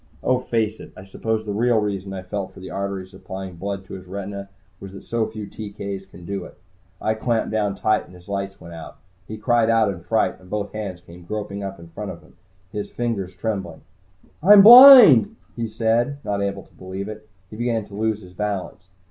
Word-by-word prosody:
Oh, 130 -1 +2
face 110 -3 -2
it, - - -11
I 95 - -11
suppose 110 +3 -3
the 105 - -3
real 120 +2 +2
reason 100 -2 -2
I 95 -1 -6
felt 95 +1 -5
for - - -13
the 95 - -9
arteries 95 -1 -4
supplying 95 -2 -8
blood 100 +1 -5
to - - -11
his 95 -1 -9
retinas 100 +1 -6 0.3
was 95 0 -10
that 95 - -10
so 115 -1 -1
few 110 -1 -7
TK's 100 -2 -7
can 90 -2 -14
do 100 0 -4
it. - - -13 0.4
I 110 - 0
clamped 110 +1 -1
down 105 -2 0
tight, 110 +2 +1
and 90 - -16
his 90 0 -17
lights 100 0 -4
went 85 0 -11
out. 80 -1 -10 0.3
He 110 - -7
cried 115 +1 +2
out 115 -3 +3
in 85 - -11
fright, 90 +6 0
and 90 -1 -18
both 105 0 -3
hands 100 -5 -6
came 85 0 -14
groping 100 +2 -5
up 95 0 -6
in 85 0 -13
front 100 +4 -7
of 85 -1 -9
him, 80 - -22 0.4
his 105 -1 -5
fingers 100 -6 -3
trembling. 95 -7 -4 0.6
"I'm 200 +4 +8
blind!" 240 - +10 0.2
he 115 -1 -3
said, 115 +5 0
not 100 -1 -1
able 100 -1 -3
to - - -26
believe 95 +2 -7
it. 110 0 -10 0.2
He - - -9
began 115 -2 -1
to 100 - -17
lose 110 0 -2
his 90 0 -14
balance. 100 -2 -4
100 Hz, 215 wpm, -22 LUFS, 95-110 Hz, 0.6 s, blind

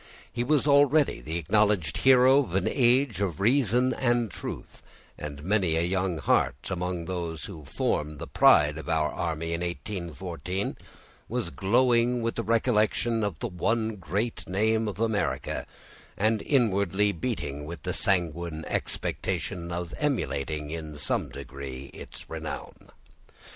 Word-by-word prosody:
He 120 - -1
was 145 +2 +2
already 145 0 +4
the 80 +2 -3
acknowledged 105 0 +2
hero 130 +1 +6
of 95 -11 -2
an 95 - +1
age 125 -4 +2
of 90 -6 -1
reason 125 +2 +3
and 120 -3 +1
truth; - - -7 0.3
and 70 -1 -7
many 95 -3 +2
a 80 - +2
young 90 -1 0
heart, - - +2 0.2
amongst 90 -2 -3
those 85 -3 -4
who 80 -7 -9
formed 75 +2 -1
the - - -6
pride 75 +1 +5
of 80 - -8
our 80 -2 +1
army 80 0 -2
in 85 - -2
1814, 90 +1 -4 0.5
was 120 -7 -2
glowing 120 - +2
with 115 - 0
the - - -2
recollection 115 0 +2
of 100 -6 -2
the 120 - -3
one 110 +3 -1
great 100 +7 -3
name 110 +3 +1
of 100 -1 -5
America, 110 -2 -1 0.5
and 110 +1 +2
inwardly 105 - +2
beating 80 - -3
with 80 -1 -8
the - - -2
sanguine 85 -3 0
expectation 90 -1 -3
of 85 0 -4
emulating, 75 - -1
in 80 -2 -6
some 70 - -1
degree, 65 0 -8
its - - -10
renown. - - -7
95 Hz, 140 wpm, -27 LUFS, 80-115 Hz, 0.5 s, hero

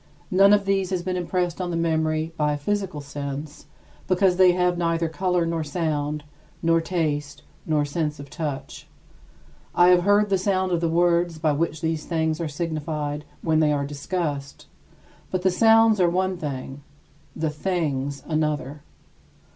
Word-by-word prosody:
None 195 +2 +6
of 205 -1 +4
these 195 -1 +1
has 185 -2 -2
been 185 0 -2
impressed 180 0 -1
on 180 - -2
the 170 - -2
memory 160 -1 0
by 150 -1 +1
a - - -2
physical 185 0 -2
sense, 145 +1 -7 0.4
because 185 -1 +3
they 185 -1 +6
have 180 0 +1
neither 165 -1 0
color 180 +1 0
nor 165 -1 -1
sound, 150 -1 -2 0.4
nor 165 0 +3
taste, 150 -4 -2 0.2
nor 150 -2 +2
sense 150 0 -2
of 140 - -8
touch. 145 -2 -6 0.9
I 175 +1 +6
have 180 -1 +6
heard 205 +2 +3
the 195 -1 +2
sound 190 -1 0
of 170 -1 +1
the 165 - +1
words 170 0 +2
by 155 -1 +1
which 155 +1 -1
these 160 -1 -2
things 160 -1 -1
are 165 - -1
signified 150 -1 -3 0.2
when 160 -1 +2
they 155 -1 +3
are 140 -1 0
discussed: 145 -1 -4 0.6
but 185 -1 -2
the 185 - +4
sounds 225 +2 +5
are 175 - +4
one 185 +2 0
thing, 140 -4 -6 0.5
the 160 -1 -1
things 145 -4 -2
another. 150 -2 -2
165 Hz, 165 wpm, -24 LUFS, 150-180 Hz, 0.9 s, None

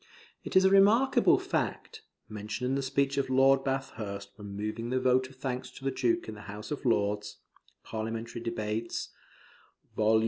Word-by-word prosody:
It - - -7
is 190 0 +7
a 190 - +5
remarkable 215 +7 +5
fact 445 -1 -3 0.3
(mentioned 105 +4 -4
in 130 - 0
the 140 - 0
speech 135 +1 0
of 135 -1 -1
Lord 135 +1 +5
Bathurst 110 -7 -4
when 100 -1 -8
moving 110 +3 -3
the 130 +1 +1
vote 130 0 +2
of 135 - -16
thanks 125 -1 -4
to 135 +1 -12
the 135 - +1
Duke 130 +5 0
in 110 - -5
the 105 - -10
House 105 +4 -7
of 145 - -4
Lords), 105 -3 0 0.5
[Parliamentary 115 +1 -4
Debates, 115 -1 -3 0.9
vol. 110 0 +4
125 Hz, 170 wpm, -30 LUFS, 110-135 Hz, 0.9 s, is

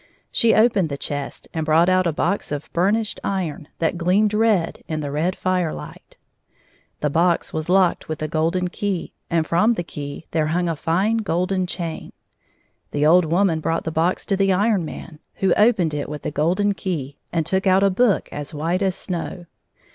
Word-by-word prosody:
She 230 -1 +3
opened 215 -6 +3
the 140 - -4
chest 145 0 -5
and 160 - -1
brought 160 +3 +4
out 185 -1 +3
a - - +2
box 195 +4 -1
of 145 0 -5
burnished 205 +5 +1
iron 180 -5 -3
that 165 +1 -1
gleamed 200 +5 +2
red 210 -6 +1
in 155 -1 -2
the 145 -1 -4
red 160 +6 0
fire 180 -3 0
hght. - - -10 0.9
The 150 - 0
box 170 +2 +1
was 155 +1 -3
locked 185 -3 +2
with 155 - -3
a - - -1
golden 165 +4 0
key, 195 -1 -3 0.2
and 165 -2 +1
from 215 +9 +3
the 175 - -2
key 145 -1 -7
there 155 -2 +1
hung 175 +3 0
a 165 - -1
fine 190 +9 +1
golden 185 -2 0
chain. 170 -3 -5 0.8
The 145 0 0
old 175 +3 +6
woman 170 0 +2
brought 165 +1 -1
the 160 - -3
box 165 +3 0
to 195 - +1
the 195 0 +2
Iron 200 -1 +2
Man, 155 0 -9 0.2
who 195 - +2
opened 210 -8 +3
it 145 -1 -3
with 150 -1 -6
the - - -3
golden 185 +8 +1
key, 150 -8 -4
and 165 -2 0
took 190 +4 0
out 190 +1 +4
a 200 - +4
book 205 +1 +2
as 145 +1 -6
white 165 +5 -1
as 190 -2 +1
snow. 175 -1 -5
175 Hz, 190 wpm, -22 LUFS, 160-195 Hz, 0.9 s, old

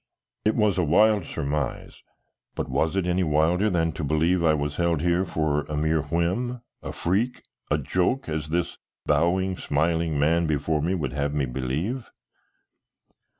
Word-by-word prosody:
It 110 - +3
was 105 -4 +2
a - - +3
wild 105 +4 +4
surmise, 75 +1 -3 0.5
but - - -3
was 80 +7 0
it 95 -2 +1
any 90 +1 +1
wilder 85 +5 +2
than 85 -3 +1
to 80 0 -6
believe 80 +4 +2
I 80 -2 +4
was 75 -1 -3
held 85 -3 +1
here 85 +2 +2
for 75 -3 0
a 75 - -4
mere 80 +1 +1
whim, 90 - -1 0.2
a - - -5
freak, 105 +9 -1 0.3
a 75 - +2
joke, 90 - 0
as 75 -1 -3
this 85 +1 -2 0.3
bowing, 90 +5 +1
smiling 80 +1 0
man 80 +4 +2
before 75 0 0
me 90 +5 0
would 70 -7 -3
have 70 +1 -1
me 70 -2 +1
believe? 70 - -3
80 Hz, 160 wpm, -25 LUFS, 75-90 Hz, 0.5 s, wild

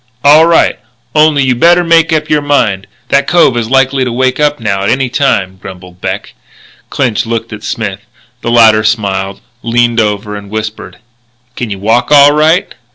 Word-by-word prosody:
"All 150 +3 +6
right. 170 - +2 0.3
Only 150 -2 +3
you 130 -1 +1
better 170 +8 +3
make 165 -1 +2
up 155 -1 0
your 150 -1 +1
mind. 115 -10 0 0.2
That 140 0 +1
cove 170 -7 +3
is 115 -2 -3
likely 135 0 +1
to 125 - -3
wake 130 +2 -1
up 150 -1 0
now 100 -3 -2
at 100 - -1
any 130 -1 0
time," 95 -8 -1
grumbled 90 -2 -12
Beck. - - -5 0.6
Clinch 125 -6 -1
looked 115 0 -4
at 105 - -9
Smith. 100 -3 -4 0.4
The - - -3
latter 110 -2 +4
smiled, 100 -3 -2 0.2
leaned 120 0 0
over, 105 -1 -2
and 100 -1 -9
whispered: 110 -4 -6 0.6
"Can 120 - -5
you 100 - -5
walk 115 +7 0
all 145 -1 +6
right?" 155 +4 +1
120 Hz, 175 wpm, -10 LUFS, 105-145 Hz, 0.6 s, All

